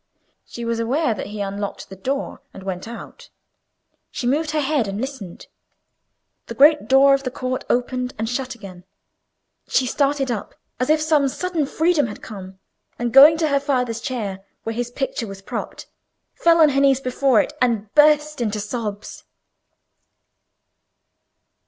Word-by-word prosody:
She 235 - -7
was 230 0 -1
aware 250 +3 +1
that 210 - -6
he 210 0 -6
unlocked 200 0 -4
the 190 - -9
door 270 +9 -4
and 195 - -10
went 190 +1 -5
out. 235 - -10 0.8
She - - -5
moved 295 +5 +1
her 305 0 0
head 285 -5 0
and 195 +1 -4
listened. 255 -9 -6 1.0
The - - -7
great 300 +2 +5
door 270 +1 +6
of 275 - +2
the 265 - -3
court 255 +1 -4
opened 250 +1 -1
and 220 +1 -2
shut 255 +1 -3
again. 190 -5 -11 0.8
She 260 - +2
started 275 0 0
up 220 - -5 0.2
as 255 - -1
if 310 0 +4
some 305 -3 +3
sudden 330 +1 -2
freedom 320 -3 +2
had 210 - -9
come, 190 -3 -9 0.4
and 240 0 -2
going 290 +4 +9
to 320 -2 +1
her 280 -1 +2
father's 250 -5 -1
chair 205 -7 -4 0.2
where 225 - -3
his 240 +1 -3
picture 245 -2 -3
was 195 0 -10
propped, - - -6 0.5
fell 335 0 +3
on 310 - +7
her 275 0 +1
knees 275 -2 +4
before 255 -2 +2
it, - - 0
and 225 -4 0
burst 300 -1 +4
into 215 -2 -1
sobs. 210 -1 -5
255 Hz, 160 wpm, -21 LUFS, 220-280 Hz, 1.0 s, going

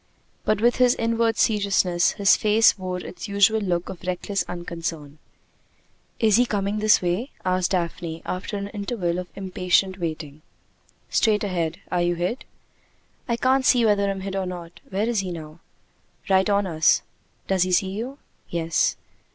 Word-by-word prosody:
But 215 -1 +1
with 240 +1 +3
his 250 -1 +4
inward 230 0 0
seriousness, 195 -5 +2
his 200 -2 +4
face 215 +1 +4
wore 185 -2 -4
its 180 +3 -7
usual 200 +2 +3
look 175 -3 -1
of 185 -3 -8
reckless 185 +2 -2
unconcern. 165 -4 -6 1.0
"Is 215 -2 +4
he 245 0 +3
coming 205 0 -1
this 215 -2 +4
way?" 180 +10 -1 0.2
asked 185 -1 +1
Daphne, 170 -2 -3
after 185 +3 -4
an 200 0 -5
interval 200 -4 -2
of 180 - -6
impatient 185 0 0
waiting. 155 -3 -5 0.7
"Straight 215 -2 +2
ahead. 170 -5 -2
Are 180 - +1
you 175 0 +1
hid?" 180 +9 -3 0.8
"I 235 - +1
can't 260 +2 +2
see 245 -2 +4
whether 200 -2 +2
I'm 195 -1 -3
hid 195 0 -5
or 190 -1 -1
not. 175 -2 -8
Where 205 +3 -1
is 235 -3 +1
he 190 -1 -3
now?" 160 -2 -8 0.7
"Right 190 +1 +3
on 200 0 +2
us." 160 -3 +3 0.4
"Does 190 -1 0
he 185 +1 +2
see 190 +1 +2
you?" 240 +7 -5 0.3
"Yes." 165 -1 +1
190 Hz, 160 wpm, -24 LUFS, 175-210 Hz, 1.0 s, his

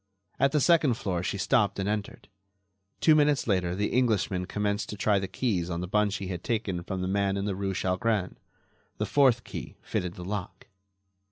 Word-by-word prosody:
At 140 - +4
the 150 - +2
second 155 -5 +4
floor 90 -6 -2
she 100 +1 -2
stopped 100 +1 +2
and 95 0 -2
entered. 105 -1 -3 0.7
Two 160 - +6
minutes 150 -2 +3
later 90 -4 0
the 105 +2 0
Englishman 100 -7 +1
commenced 105 +1 -1
to 105 - -6
try 100 -1 +2
the 95 - -3
keys 95 -6 -1
on 85 0 -3
the 90 - -4
bunch 105 +1 +1
he 100 -1 -4
had 90 -2 -5
taken 105 -6 -1
from 95 +1 -4
the - - -1
man 100 0 +1
in 100 - -2
the 100 - -1
rue 95 0 -2
Chalgrin. 95 +2 0 0.6
The - - -1
fourth 130 -5 +3
key - - -7
fitted 90 -1 -3
the 90 - -8
lock. 100 -1 -5
100 Hz, 195 wpm, -28 LUFS, 95-115 Hz, 0.7 s, Two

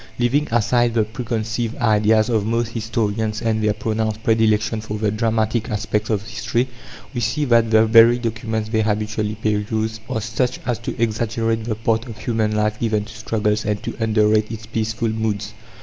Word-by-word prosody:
Leaving 135 +5 +1
aside 120 +1 +2
the 110 - +4
preconceived 115 0 -3
ideas 110 -1 +3
of 110 -4 +1
most 115 +1 0
historians 110 -1 -1
and 110 -1 0
their 105 -1 +2
pronounced 110 0 -2
predilection 110 0 +2
for 105 -1 -5
the 105 -1 0
dramatic 110 +1 0
aspects 105 0 -1
of 105 -3 0
history, 110 +4 -1 0.5
we 120 - -2
see 145 +7 0
that 115 -3 +4
the 110 0 +5
very 115 +2 +7
documents 110 -2 -3
they 110 -1 +1
habitually 105 0 -1
peruse 110 +1 -1
are 120 -4 -1
such 120 +3 -1
as 120 -4 -1
to 115 - -6
exaggerate 115 0 0
the 115 -2 -1
part 115 +2 0
of 115 -2 -8
human 110 -1 -1
life 105 0 0
given 110 -2 0
to - - -11
struggles 105 -1 -1
and 105 -1 -2
to - - -4
underrate 110 -1 +2
its 110 -1 -7
peaceful 110 +1 -2
moods. 110 -2 -2
110 Hz, 175 wpm, -21 LUFS, 110-115 Hz, 0.5 s, very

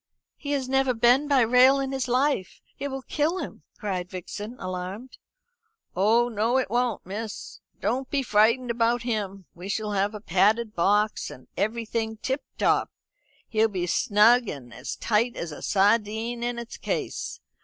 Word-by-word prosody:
"He 290 -1 -4
has 270 -2 -1
never 265 -1 +2
been 245 +5 +4
by 280 -3 +4
rail 250 +4 +6
in 270 0 -2
his 265 -1 -2
life. 255 -5 0 0.2
It 280 - -2
will 270 -1 -5
kill 310 +7 0
him!" - - -6 0.2
cried 185 -5 -3
Vixen, 205 +5 -7
alarmed. 185 +7 -6 0.8
"Oh 220 +6 +4
no 230 +2 +1
it 260 -6 -1
won't, 240 -2 0
miss. 210 +3 -6 0.2
Don't 260 +1 -1
be 275 -2 0
frightened 235 +2 +3
about 235 0 +1
him. 200 -5 -3
We 180 +3 -9
shall 210 +1 -2
have 205 +1 0
a - - -5
padded 210 +4 +2
box, 205 +5 +1
and 125 - -12
everything 220 0 -2
tip 265 +5 -2 0.2
top. - - +2 0.6
He'll 220 0 +2
be 185 -4 -3
as 180 - 0
snug 225 +3 +4
and 125 -4 -8
as 125 +3 -6
tight 230 +2 +1
as 170 - -5
a 150 - -9
sardine 220 +3 +1
in 240 0 -2
its 235 -1 -7
case. - - -3
225 Hz, 165 wpm, -26 LUFS, 205-250 Hz, 0.8 s, rail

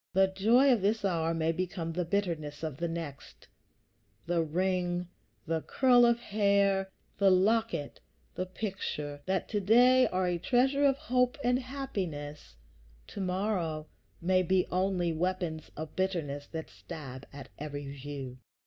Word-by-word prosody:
The 190 0 +4
joy 240 +7 +5
of 230 - 0
this 205 +2 +1
hour 165 -3 +1
may 165 0 +1
become 170 -1 -3
the 180 +1 -1
bitterness 165 -6 -2
of 155 -4 -3
the 170 - -1
next; 145 - -7 0.8
the 170 0 +1
ring, 180 +1 -1 0.4
the 160 0 -1
curl 245 - +5
of 235 0 +3
hair, 200 -3 +2 0.3
the 200 -1 +6
locket, 190 -4 +1 0.3
the 185 - -3
picture, 165 -8 -4
that 190 -1 0
to 210 - 0
day 245 +6 +5
are 185 0 0
a 175 -1 0
treasure 265 +7 +2
of 275 -1 +4
hope 250 -4 +1
and 245 +1 +3
happiness, 185 - -5 0.5
to 200 - -6
morrow 180 -5 -1 0.3
may 185 +2 +3
be 185 0 +2
only 180 -2 +1
weapons 175 -2 -2
of 155 0 -6
bitterness 160 -7 -2
that 160 -1 -6
stab 140 -6 -9
at 140 -1 -10
every 145 -1 -5
view. 135 -2 -7
180 Hz, 145 wpm, -30 LUFS, 160-205 Hz, 0.8 s, the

